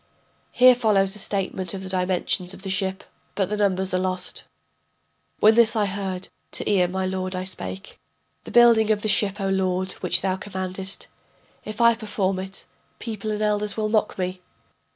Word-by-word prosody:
[Here 255 +1 +7
follows 210 -5 +2
a - - -8
statement 190 -2 -2
of 190 - -6
the 190 - -6
dimensions 185 0 0
of - - -14
the 195 - -3
ship, 190 0 -1 0.3
but 195 -2 0
the 210 - -1
numbers 190 -2 0
are 185 - +2
lost.] 185 0 -2 0.9
When 215 +1 +6
this 235 0 +4
I 215 -2 +2
heard 190 -2 -4 0.2
to - - -1
Ea 190 -4 +3
my 190 +1 -2
lord 185 0 -3
I 185 - -3
spake: 95 - -6 0.4
The - - -10
building 235 -2 +5
of 210 -1 +1
the - - 0
ship, 205 0 +1
O 195 - -1
lord, 185 -1 0
which 180 -1 +4
thou 190 -1 -1
commandest 190 0 -5 0.6
If 215 +1 -7
I 235 0 +6
perform 205 -4 -2
it, 190 +1 -7 0.3
people 220 -2 -5
and 215 0 -2
elders 210 0 0
will 215 -1 0
mock 215 -1 0
me. 185 0 -3
195 Hz, 180 wpm, -23 LUFS, 185-210 Hz, 0.9 s, Here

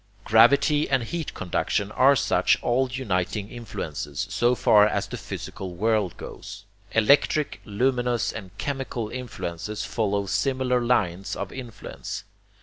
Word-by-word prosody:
Gravity 140 +8 +5
and 135 -3 +2
heat 160 +6 -4
conduction 100 +3 -1
are 135 +5 +5
such - - +3
all 130 +2 +2
uniting 105 -4 -2
influences, 80 - -5
so 120 +1 +2
far 105 -3 +5
as - - -1
the - - -7
physical 95 -2 -7
world 105 -2 +1
goes. - - -9 0.3
Electric, 140 +6 +3
luminous 125 +2 0
and 100 -4 -7
chemical 130 -5 -3
influences 105 -5 -5
follow 100 -3 -1
similar 130 +3 +1
lines 100 -6 0
of 100 - -5
influence. 120 -5 -7
115 Hz, 125 wpm, -25 LUFS, 100-130 Hz, 0.3 s, Gravity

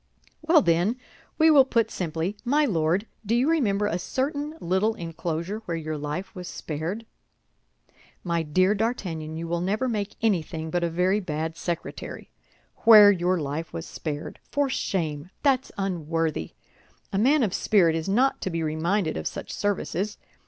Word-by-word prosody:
"Well, 320 -2 +5
then, 175 +7 +2 0.4
we 320 0 +6
will 285 -3 +8
put 230 -4 +1
simply, 165 +2 -2
My 290 +5 +3
Lord, 175 - +1 0.2
do 225 +2 0
you 250 +4 +2
remember 215 -11 +2
a 180 -3 -1
certain 285 - -2
little 190 +4 +1
enclosure 170 +3 -4
where 170 -1 -2
your 155 -1 -4
life 150 +6 -4
was 180 -1 -7
spared?" 170 +9 -4 1.2
"My 170 -2 0
dear 185 +6 +2
D'Artagnan, 185 -8 -2
you 165 +1 -4
will 170 0 -1
never 210 +8 0
make 210 -4 -2
anything 165 -7 -1
but 175 +1 0
a 170 - +1
very 180 +4 +2
bad 160 -3 -3
secretary. 170 0 -5 0.5
Where 215 -3 +9
your 180 -1 +1
life 155 +2 -4
was 165 - -5
spared! 150 -2 -6
For 285 -2 0
shame! 160 - -2
that's 270 -3 +2
unworthy. 165 - -2 0.6
A 195 - +1
man 270 +5 +4
of 200 -5 0
spirit 175 -6 +3
is 165 +3 -2
not 255 +7 +2
to - - -2
be 165 -2 -2
reminded 160 +3 0
of - - -3
such - - -6
services. 205 0 -2
185 Hz, 160 wpm, -26 LUFS, 165-220 Hz, 1.2 s, Where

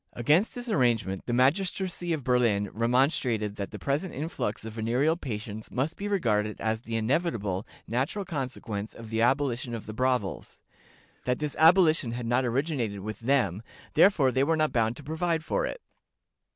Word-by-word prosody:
Against 150 - +2
this 245 0 -6
arrangement 115 - +1
the - - -1
magistracy 175 +7 +1
of 155 -4 -1
Berlin 115 -5 +2
remonstrated 115 -3 +1
that 100 -1 -4
the - - -8
present 145 +7 -2
influx 145 -8 -3
of 110 - -6
venereal 120 +8 +1
patients 110 -7 -6
must 135 +6 -1
be 205 - -4
regarded 110 - 0
as 110 +1 -1
the 115 -1 -5
inevitable, 110 - 0 0.2
natural 135 - -1
consequence 125 - -4
of 115 -1 -10
the 115 0 0
abolition 125 -1 +1
of 115 - -7
the 110 - -7
brothels; 125 -5 -1 0.7
that 125 0 +1
this 150 -2 -3
abolition 160 -7 +5
had 120 0 -4
not 120 +3 +2
originated 120 -5 -1
with 110 +1 -6
them, 115 -6 +1 0.3
therefore 150 -10 +5
they 130 +1 +2
were 160 +3 +2
not 155 -1 +2
bound 115 -1 +1
to 150 - -10
provide 160 +2 -1
for - - 0
it." - - -7
125 Hz, 165 wpm, -28 LUFS, 110-155 Hz, 0.7 s, abolition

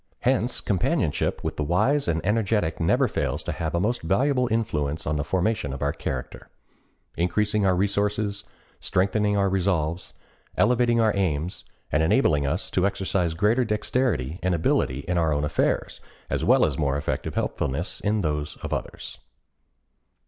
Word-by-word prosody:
Hence 125 -1 +1
companionship 95 -5 0
with - - -3
the 75 - 0
wise 110 - +2
and 80 0 -1
energetic 105 -5 +1
never 85 - +3
fails - - -2
to - - -3
have 80 0 -3
a - - +2
most 115 +6 0
valuable 125 - +1
influence 80 -10 -1
on 75 - 0
the 75 - -1
formation 95 -2 -1
of 70 +1 -2
character—increasing 95 - -3
our 95 - +3
resources, 100 +1 0 0.4
strengthening 105 +2 +1
our 100 -1 +3
resolves, 90 -3 -1 0.4
elevating 120 -1 +3
our 110 -2 +3
aims, 90 -3 -2 0.3
and 75 - +2
enabling 75 -2 +3
us 90 +10 -2
to 95 +1 +2
exercise 95 -4 -1
greater 105 +8 +2
dexterity 105 - -1
and 90 -1 +1
ability 70 -4 +1
in 90 -1 +1
our 80 -2 +2
own 75 0 0
affairs, 75 - -1 0.3
as - - 0
well - - +5
as - - -2
more 70 -2 +1
effective 70 - -3
helpfulness 70 +6 -2
in 105 0 0
those 75 -3 -2
of - - -3
others. - - -6
95 Hz, 150 wpm, -25 LUFS, 80-105 Hz, 0.4 s, well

